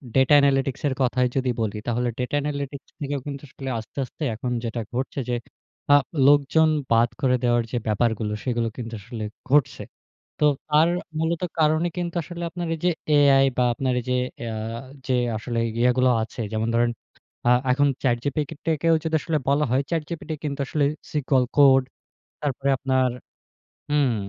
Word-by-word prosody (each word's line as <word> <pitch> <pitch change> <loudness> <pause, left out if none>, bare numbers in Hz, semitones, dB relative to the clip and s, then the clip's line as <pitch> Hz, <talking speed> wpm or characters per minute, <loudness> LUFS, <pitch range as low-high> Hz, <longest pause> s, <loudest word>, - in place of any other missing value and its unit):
Data 135 +2 +5
analytics 135 -2 +2
এর 135 - 0
কথায় 125 0 +2
যদি 130 -1 +1
বলি 105 -1 -2
তাহলে 120 +1 0
ডাটা 125 +2 -2
অ্যানালিটিক্স 140 -1 -4
থেকেও 145 -1 -2
কিন্তু 140 0 -6
আসলে 135 +1 -7
আস্তে, 110 - -13
আস্তে 140 - -9
এখন 125 +3 -4
যেটা 115 +1 -3
ঘটছে 130 +3 -3
যে 120 - +1 0.6
আ - - +9 0.3
লোকজন 145 +2 +5 0.2
বাদ 115 +1 +4
করে 130 -3 +3
দেওয়ার 120 -1 +3
যে 120 - -1
ব্যাপারগুলো 110 0 0
সেগুলো 120 -2 0
কিন্তু 115 -1 -6
আসলে 115 +1 -7 0.3
ঘটছে। 145 -1 +2 0.6
তো 150 - +4 0.2
তার 155 +2 +5 0.3
মূলত 165 +2 0 0.2
কারণে 155 +2 +3
কিন্তু 175 -1 -3
আসলে 175 +1 -7
আপনার 175 -1 -4
এই - - -11
যে - - +5 0.3
এআই 135 -1 +6
বা 125 - +3
আপনার 130 +1 -1
এই - - -16
যে - - +2 0.4
আ - - -4 0.5
যে 130 - +2 0.2
আসলে 115 +1 -3 0.2
ইয়েগুলো 125 +1 +3
আছে 115 +1 -7
যেমন 110 +1 0
ধরেন, 120 0 +3 0.6
আ - - +6 0.2
এখন 145 +3 +3 0.2
ChatGPT-কেও 145 +5 0
যদি 160 -1 0
আসলে 165 -3 0
বলা 145 +2 +3
হয় 130 +2 +3
ChatGPT 165 0 -3
কিন্তু 140 -1 -3
আসলে 145 0 +1 0.3
সিকিউর 135 -3 +2
কোড 135 -2 +7 0.6
তারপরে 140 -1 -1
আপনার 130 0 +1 0.8
হুম, 145 -5 +2
135 Hz, 160 wpm, -24 LUFS, 120-150 Hz, 0.8 s, আ